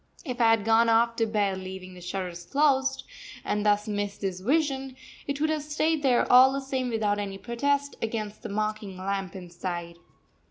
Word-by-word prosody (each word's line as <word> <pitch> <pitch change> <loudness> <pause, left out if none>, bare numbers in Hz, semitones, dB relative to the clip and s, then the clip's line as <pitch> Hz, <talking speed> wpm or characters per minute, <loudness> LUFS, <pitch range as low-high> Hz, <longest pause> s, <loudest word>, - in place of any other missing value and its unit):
If 250 -3 -3
I 230 - +6
had 225 -2 +3
gone 225 +1 +4
off 230 +1 +3
to 225 - +2
bed 205 -3 0
leaving 185 0 -8
the 180 - -12
shutters 180 -1 -5
closed, 275 -2 +2 0.4
and 210 0 0
thus 210 0 +2
missed 205 -1 -3
this 190 -2 -2
vision, 270 - 0 0.3
it 280 0 -2
would 310 +1 +1
have 310 -1 -1
stayed 305 +1 0
there 255 -4 +3
all 255 +1 +9
the 275 - -1
same 265 -2 -2
without 210 -3 0
any 195 -1 -4
protest 280 +6 -1
against 215 -2 -3
the - - -6
mocking 215 -2 -3
lamp 195 -1 -3
inside. 175 -1 -6
220 Hz, 185 wpm, -27 LUFS, 195-265 Hz, 0.4 s, all